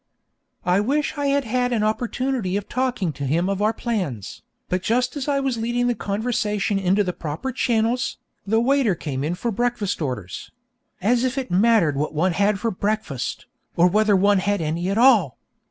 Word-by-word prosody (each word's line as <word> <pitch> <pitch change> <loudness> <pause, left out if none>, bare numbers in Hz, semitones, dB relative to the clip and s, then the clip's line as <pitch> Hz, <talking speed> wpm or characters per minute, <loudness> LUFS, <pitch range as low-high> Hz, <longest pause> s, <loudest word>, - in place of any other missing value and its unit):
I 180 +2 +3
wish 280 +10 0
I 285 -1 -1
had 280 0 +2
had 245 +1 0
an 225 -3 +1
opportunity 230 -2 -1
of 205 - -5
talking 250 -10 -1
to 140 - -7
him 170 +6 +1
of 195 0 -1
our 215 +1 +3
plans, 185 - -4 0.3
but 180 0 -1
just 250 +6 0
as 285 -1 -4
I 280 -1 +1
was 265 -4 -1
leading 240 +2 0
the 245 - +2
conversation 210 -2 -1
into 195 +2 +2
the 180 -2 -2
proper 165 - -4
channels, 240 +1 0 0.3
the 220 +2 +3
waiter 250 -4 +2
came 140 -4 -4
in 160 +4 -1
for 235 +6 -2
breakfast 235 -4 -1
orders 115 - -4 0.5
as 240 +4 +3
if 260 +1 -1
it 260 -6 -3
mattered 195 -5 +3
what 150 +2 -2
one 180 +5 +2
had 200 +3 +1
for 230 +2 -1
breakfast, 205 - -3 0.3
or 175 +1 +5
whether 210 +2 +3
one 200 +1 +4
had 205 +2 0
any 165 +3 -2
at 195 - -1
all. 225 - +5
210 Hz, 185 wpm, -22 LUFS, 180-245 Hz, 0.5 s, or